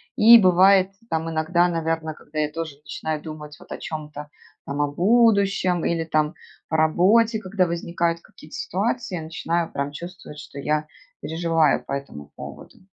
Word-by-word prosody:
И 230 +2 +9
бывает 190 +1 +5 0.2
там 160 0 -1
иногда, 170 +2 +2
наверно. 165 -2 -2
Когда 155 +1 -7
я 150 0 0
тоже 160 -3 -6
начинаю 150 +1 -5
думать 150 -1 -9
вот - - -17
о - - -4
чём-то. 150 -1 -7 0.4
Там 145 +1 -3
о 145 -1 0
будущем 200 -2 +3
или 165 -1 0
там 155 -1 0 0.3
по - - -2
работе, 200 +9 +3
когда 185 -2 0
возникают 170 0 -1
какие-то 155 - -14
ситуации. 210 +2 -2
Я 165 - -4
начинаю 165 +1 -2
прям 140 +1 -3
чувствовать, 175 -1 -9
что 140 -1 -10
я 150 +1 -1 0.3
переживаю 165 -2 +1
по - - -9
этому 75 - -7
поводу. - - -11
165 Hz, 160 wpm, -23 LUFS, 150-180 Hz, 0.4 s, И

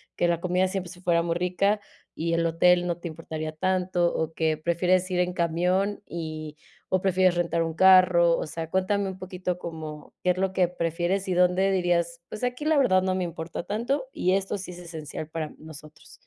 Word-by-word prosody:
que 175 - +1
la 170 -1 +1
comida 180 +1 +1
siempre 185 -2 -4
sí 180 -1 -13
fuera 170 -2 +2
muy 170 0 -1
rica 180 +4 +1 0.4
y 165 +1 -1
el 170 0 +1
hotel 175 +2 +3
no 170 - -1
te 175 0 -7
importaría 155 -1 -5
tanto, 180 +1 0
o 160 0 -2
que 160 -1 0
prefieres 180 +3 +1
ir 180 - 0
en 180 0 +1
camión 180 +4 0
y 155 -2 -6 0.3
o 185 -1 +1
prefieres 185 -1 +3
rentar 170 -1 0
un 165 -1 -3
carro? 180 -2 +6
O - - -3
sea, 160 +1 -5
cuéntame 195 +1 +1
un 190 - -8
poquito 180 -1 -4
como, 155 -3 -8
¿qué 180 - +4
es 180 - -2
lo 190 0 0
que 180 -2 +3
prefieres, 175 +3 -1
y 185 - 0
dónde 180 +2 +3
dirías: 170 -2 0
"Pues, 215 +3 -7
aquí 250 +3 -2
la 310 -1 +3
verdad 185 -9 +4
no 185 0 +1
me 185 -1 -1
importa 165 0 -5
tanto, 235 - -1
y 185 - +1
esto 195 +1 0
sí 185 -1 -7
es 175 - -10
esencial 160 -3 -7
para 160 -1 -4
nosotros"? 155 -1 -13
180 Hz, 205 wpm, -26 LUFS, 165-185 Hz, 0.4 s, carro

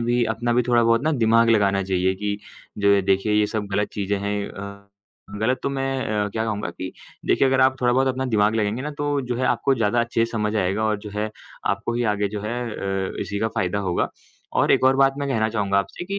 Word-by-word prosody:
भी 120 +1 +1
अपना 120 +2 -1
भी 125 +1 +3
थोड़ा 120 -1 +4
बहुत 115 +1 +3
ना 155 +1 +1
दिमाग 115 -2 +4
लगाना 100 -3 +3
चाहिए 95 0 0
कि 105 +1 -2 0.4
द 100 -1 +4
देखिए, 100 +2 +2
ये 105 0 +3
सब 105 -1 -3
गलत 105 +1 +1
चीज़ें 100 0 -1
हैं। 100 0 -2
अ, 100 0 -9 0.5
गलत 125 +4 +1
तो - - 0
मैं 135 -1 -2 0.3
अ, - - -2
क्या 110 +2 -2
कहूँगा 105 -5 -2
कि 95 +2 -7 0.3
देखिए, 135 - +3
अगर 130 0 +2
आप 130 0 +3
थोड़ा 120 -1 +3
बहुत 130 +1 +2
अपना 130 0 -1
दिमाग 105 +1 +3
लगाएँगे 110 +3 0
ना, 150 - -3
तो 145 -1 -1
जो 125 -2 -3
है 130 - -1
आपको 135 +3 +2
ज़्यादा 115 0 +1
अच्छे 115 -1 +1
से 115 - -6
समझ 105 -1 -1
आएगा 100 +3 0
और 105 -1 +1
जो 105 0 -9
है 105 +1 -2 0.4
आपको 100 +4 -1
ही 120 - 0
आगे 105 0 -1
जो 105 0 -5
है 115 +4 -3
अ, 95 -2 -3
इसी 100 0 -3
का 110 - 0
फ़ायदा 95 -1 -1
होगा। 85 - 0 0.5
और - - +3
एक - - +3
और 135 0 +5
बात 135 0 +4
मैं 140 - -2
कहना 110 -4 +1
चाहूँगा 100 -3 +1
आपसे 100 - -4
कि 200 +2 -3
110 Hz, 240 wpm, -23 LUFS, 100-125 Hz, 0.5 s, और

